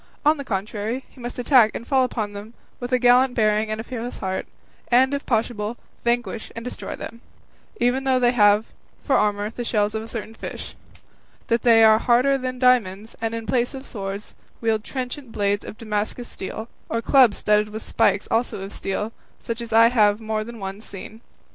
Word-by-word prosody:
On 305 +1 +5
the 280 - -5
contrary, 215 +3 -3
he - - -19
must 240 0 -6
attack 245 -3 +4
and 235 - -6
fall 265 -2 +3
upon 215 -5 -2
them 205 +3 -9 0.2
with 245 0 -5
a 255 - +4
gallant 245 +1 +4
bearing 215 -1 +2
and 215 0 -3
a - - -3
fearless 240 0 -6
heart, 190 -1 -3 0.4
and, 260 +3 +4
if 280 - -3
possible, 225 -1 -1 0.3
vanquish 235 -1 -1
and 230 +1 -7
destroy 250 - -5
them, 230 +1 -9 0.6
even 250 +2 +2
though 265 -1 +3
they 245 -1 +4
have 210 -2 +4 0.4
for 275 - +2
armour 210 0 +1
the 240 - -5
shells 210 -3 +1
of 220 - -2
a 225 - -8
certain 225 -1 -6
fish, - - -7 0.7
that 230 0 +2
they 230 -2 +6
say - - +8
are 220 0 +7
harder 250 +4 +3
than 255 -1 -3
diamonds, 225 -5 +2
and 225 0 -1
in 230 -1 -5
place 245 +3 0
of 265 +1 -8
swords 200 -2 -6 0.3
wield 220 -2 0
trenchant 255 0 -5
blades 205 -1 0
of 215 - -9
Damascus 215 +2 -3
steel, 220 +3 -6 0.2
or 230 0 -1
clubs 255 -6 +5
studded 210 0 +2
with 215 +1 -7
spikes 200 0 +1
also 225 -3 0
of 195 +1 -7
steel, 210 +3 -3 0.3
such 230 0 -4
as 230 -1 -7
I 230 +1 +7
have 210 -3 +3
more 220 -1 -2
than 235 +1 -9
once 195 +1 -6
seen. 210 +3 -9
225 Hz, 200 wpm, -23 LUFS, 210-245 Hz, 0.7 s, say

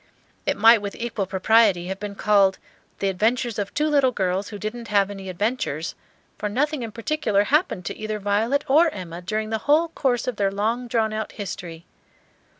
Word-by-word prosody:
It - - +1
might 225 0 +7
with 200 -1 -5
equal 230 -4 -3
propriety 195 -1 +3
have 190 +1 -5
been 205 -1 -6
called 200 -2 +3 0.4
"The 195 - 0
Adventures 225 +4 0
of 200 - -3
two 300 +1 0
little 285 -3 +4
Girls 190 -2 -1
who 210 - -7
didn't 225 +3 -5
have 205 -2 +2
any 195 -1 -7
Adventures," 185 - -2 0.5
for 210 - -2
nothing 290 +6 0
in 230 -2 -5
particular 225 -3 0
happened 285 - +1
to - - -4
either 215 0 -4
Violet 215 +8 0
or 320 +5 +5
Emma 180 - -7
during 215 +4 -3
the 220 - 0
whole 320 +3 +4
course 255 -6 0
of 250 -4 -2
their 200 -1 +2
long 225 +5 -1
drawn 220 -2 0
out 220 0 -4
history. 175 -5 -7
215 Hz, 185 wpm, -23 LUFS, 195-240 Hz, 0.5 s, might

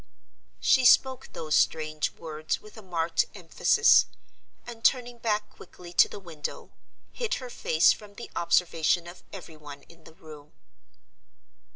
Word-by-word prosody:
She 260 - +3
spoke 260 +1 +4
those 155 -2 -4
strange 155 -1 +1
words 155 -1 -4
with 215 - -16
a 220 - -11
marked 170 -3 -1
emphasis; 200 - +3 0.6
and 235 -1 -10
turning 245 -2 +1
back 210 -2 -2
quickly 175 -1 -14
to - - +5
the - - -9
window, 165 -6 -8 0.4
hid 470 -3 -2
her 255 -2 -8
face 160 -7 +3
from 205 -1 -14
the 235 - -10
observation 170 0 +1
of 175 +1 -12
every 170 -5 -11
one 145 -2 -11
in 165 -1 -20
the 160 - -16
room. 155 -4 -14
175 Hz, 145 wpm, -27 LUFS, 160-225 Hz, 0.6 s, to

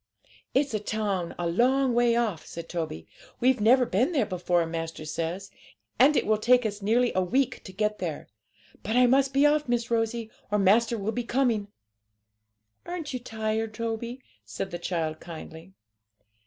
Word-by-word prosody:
'It's 275 -1 +2
a 215 - 0
town 200 -5 -2
a 175 - -3
long 250 +9 +2
way 240 0 +3
off,' 220 -9 0
said 165 0 -7
Toby; 160 - -4 0.3
'we've 255 -2 +3
never 250 +4 +5
been 245 - +1
there 265 -8 +2
before, 175 -2 0
master 165 -1 -5
says, 170 +5 -4 0.5
and 280 +4 +6
it - - +1
will 215 0 +2
take 250 +2 +4
us 205 -1 -3
nearly 235 +5 +2
a 185 - +2
week 250 +8 0
to 190 - -8
get 210 +2 -1
there. 165 -5 -4 0.5
But 220 +4 -2
I 250 0 +6
must 265 +2 +3
be 275 +2 +4
off, 295 -2 +2
Miss 240 0 0
Rosie, 225 -1 -1 0.2
or 210 - +1
master 225 +4 +3
will 210 +1 -2
be 245 +2 -3
coming.' 235 -4 +1 1.2
'Aren't 345 -5 -5
you 255 - -2
tired, 220 -1 -3
Toby?' 230 +3 -4 0.2
said 190 - -5
the 175 - -5
child 165 -3 -2
kindly. 165 +1 -10
220 Hz, 170 wpm, -27 LUFS, 185-245 Hz, 1.2 s, and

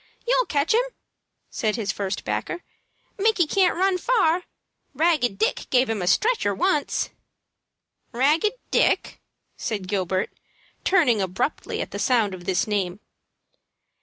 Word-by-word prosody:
You'll - - +2
catch 290 +4 +1
him," 460 - +5 0.7
said 215 -2 -1
his 215 -4 -1
first 195 -1 -3
backer. 350 - -3 0.6
"Micky 410 -4 +3
can't 370 +2 +2
run 375 0 +2
far. 365 -7 +2 0.5
Ragged 300 - +2
Dick 220 - 0
give 250 -2 +3
him 215 -3 -2
a 180 - -2
stretcher 315 - +2
once." 300 - 0 1.0
"Ragged 300 - +2 0.2
Dick!" - - +1 0.4
said 205 -5 -3
Gilbert, 185 -1 -1 0.5
turning 255 - +3
abruptly 190 - -2
at - - -11
the - - -5
sound 225 -6 +2
of 175 -1 -9
this 185 -1 +1
name. 200 -3 -2
250 Hz, 130 wpm, -24 LUFS, -, 1.0 s, him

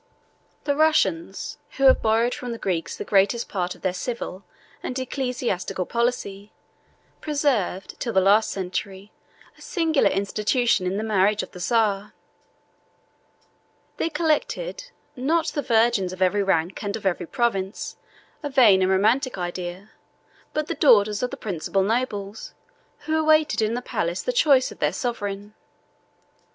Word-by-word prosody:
The 285 - 0
Russians, 315 +2 +1 0.2
who 275 - -1
have 265 -1 +6
borrowed 225 +2 +2
from 250 -1 -5
the 230 - -4
Greeks 180 -6 -2
the - - -5
greatest 200 +4 +2
part 180 -2 -3
of - - -21
their 185 -2 0
civil 200 -2 -5 0.4
and 255 - -4
ecclesiastical 250 -8 -2
policy, 215 -4 -2 0.7
preserved, 275 - -1
till 235 - -2
the 190 - +4
last 205 +3 +4
century, 190 +1 -5 0.5
a - - -18
singular 325 -5 +1
institution 210 +1 +1
in 190 +2 -1
the 215 - -2
marriage 210 -1 +2
of - - -10
the 180 - -11
Czar. 210 0 0 1.8
They - - 0
collected, 335 +11 -1 0.3
not 315 +5 +1
the 290 - -2
virgins 230 -6 +2
of 185 - -9
every 200 +2 +2
rank 180 -2 0
and 200 0 -2
of 220 - -8
every 175 -2 0
province, 195 -4 -2 0.5
a 290 - -4
vain 230 -9 +5
and 185 - +2
romantic 220 +7 +2
idea, 180 +2 -5 0.6
but 305 0 -1
the 335 - -3
daughters 215 -9 +4
of 250 - 0
the - - -7
principal 190 0 -1
nobles, 215 -2 -3 0.5
who 315 0 0
awaited 310 -7 +3
in 220 +1 +1
the 245 - -4
palace 170 -4 -2
the - - -1
choice 280 - +4
of - - -12
their - - +1
sovereign. 205 -4 -4
220 Hz, 145 wpm, -24 LUFS, 195-260 Hz, 1.8 s, have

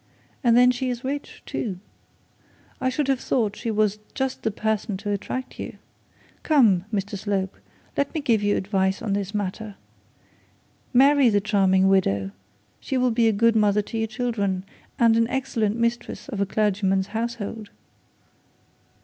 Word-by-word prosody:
And 235 -1 +5
then 250 0 +7
she 255 +1 -2
is 245 0 -4
rich 280 +2 -5
too. 195 -6 -3 1.0
I 260 - +2
should 270 +2 -1
have 270 -2 +1
thought 215 -7 0
she 235 - -4
was 215 -1 +1 0.2
just 265 -1 -2
the 220 - 0
person 215 -1 -2
to 205 +1 -4
attract 255 +6 -4
you. - - -6 0.6
Come, 220 - +4
Mr 200 -1 -2
Slope, 195 -1 -2 0.4
let 280 - 0
me - - +1
give 235 -7 +2
you 205 0 +2
advice 190 +2 0
on 210 -4 -1
this 200 +1 -2
matter. 205 +1 -4 1.2
Marry 275 0 +5
the 205 -2 +3
charming 195 -2 +3
widow! 100 - +2 0.5
She 265 - -2
will 250 -1 +2
be 230 0 +3
a - - +4
good 225 +2 +3
mother 210 -1 +3
to 225 - -6
your 225 - 0
children 215 -5 -2 0.3
and 230 -3 +5
an 230 0 +3
excellent 235 -5 -1
mistress 235 0 -2
of 210 -6 -3
a 200 - +1
clergyman's 195 -2 +1
household.' 225 -2 -4
220 Hz, 160 wpm, -24 LUFS, 200-245 Hz, 1.2 s, then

